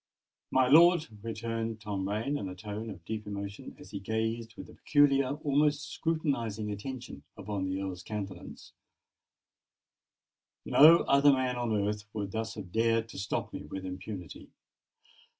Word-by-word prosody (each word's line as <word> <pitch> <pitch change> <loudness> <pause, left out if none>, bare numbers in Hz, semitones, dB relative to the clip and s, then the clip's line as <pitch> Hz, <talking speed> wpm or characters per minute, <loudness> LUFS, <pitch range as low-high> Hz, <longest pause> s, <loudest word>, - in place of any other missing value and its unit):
"My 130 -1 +3
lord," 170 +3 +6
returned 115 0 -3
Tom 100 -3 -3
Rain 110 +8 -1
in 100 -9 -3
a 90 - -7
tone 105 +3 -6
of 85 -5 -10
deep 110 0 -5
emotion, 100 0 -6
as - - -13
he 100 - -4
gazed 110 +3 -2
with - - -7
peculiar—almost 145 +1 +2
scrutinising 120 -10 -1
attention 125 +5 -6 0.2
upon 100 -1 -3
the 95 +1 -2
Earl's 95 -2 -4
countenance,—"no 100 -1 -7 2.3
other 140 +1 +5
man 130 -2 +1
on 120 -3 -1
earth 105 0 -3
would 100 -2 -3
thus 110 +1 -3
have 90 - -8
dared 115 +1 +1
to - - -8
stop 95 - -3
me - - -6
with 95 +4 -6
impunity. 95 -1 -7
110 Hz, 135 wpm, -30 LUFS, 100-130 Hz, 2.3 s, lord